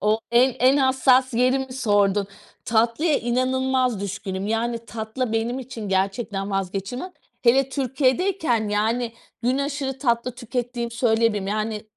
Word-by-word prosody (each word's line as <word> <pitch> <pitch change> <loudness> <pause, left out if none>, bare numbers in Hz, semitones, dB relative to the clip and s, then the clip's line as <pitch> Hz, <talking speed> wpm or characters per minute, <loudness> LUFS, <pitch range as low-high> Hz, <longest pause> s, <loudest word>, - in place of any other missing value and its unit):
O 215 +2 +2
en, 245 +2 +4
en 260 +3 +5
hassas 260 -1 +3
yerimi 255 +2 +1
sordun. 205 -5 +2 0.4
Tatlıya 235 +8 +2
inanılmaz 255 -1 0
düşkünüm, 195 0 -4
yani, 230 +2 -1
tatlı 225 +2 -4
benim 230 +3 -1
için 235 -5 -7
gerçekten 195 +1 -1
vazgeçilmez. 195 - -3 0.3
Hele 265 +2 +4
Türkiye'deyken, 265 - 0
yani, 225 +3 0 0.3
gün 255 +3 +1
aşırı 280 -2 -3
tatlı 240 -2 0
tükettiğimi 245 -1 -4
söyleyebilirim. 225 -4 +1
Yani, 215 +1 -2
240 Hz, 120 wpm, -23 LUFS, 215-260 Hz, 0.4 s, en